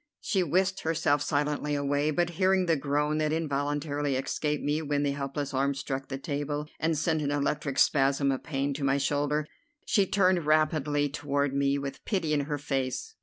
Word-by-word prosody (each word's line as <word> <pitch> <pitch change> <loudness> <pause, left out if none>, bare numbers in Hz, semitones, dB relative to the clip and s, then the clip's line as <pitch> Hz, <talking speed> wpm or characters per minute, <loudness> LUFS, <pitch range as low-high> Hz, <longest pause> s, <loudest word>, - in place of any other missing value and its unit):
She 190 - 0
whisked 185 +3 +1
herself 160 -4 +1
silently 150 0 0
away, 145 +1 +1
but, 175 +3 0
hearing 190 0 +4
the 165 -2 +3
groan 150 +2 0
that 155 -1 +1
involuntarily 145 -2 -1
escaped 150 +3 -1
me 150 +2 0
when 145 -1 0
the 140 - +1
helpless 140 0 -4
arm 140 +1 +1
struck 135 0 -4
the 135 - -4
table 145 +1 -3
and 160 0 +1
sent 160 +1 +1
an 145 - -1
electric 145 -1 -1
spasm 140 -1 +3
of 135 - -2
pain 140 -1 -2
to 140 +1 -5
my 135 0 +2
shoulder, 145 +2 0 0.4
she 200 -2 +2
turned 185 -5 +2
rapidly 150 -1 +2
toward 140 -1 -1
me 140 0 +2
with 140 -1 -6
pity 175 -7 -1
in 145 -2 +1
her 145 0 -2
face. 135 - -3
145 Hz, 180 wpm, -28 LUFS, 140-155 Hz, 0.4 s, hearing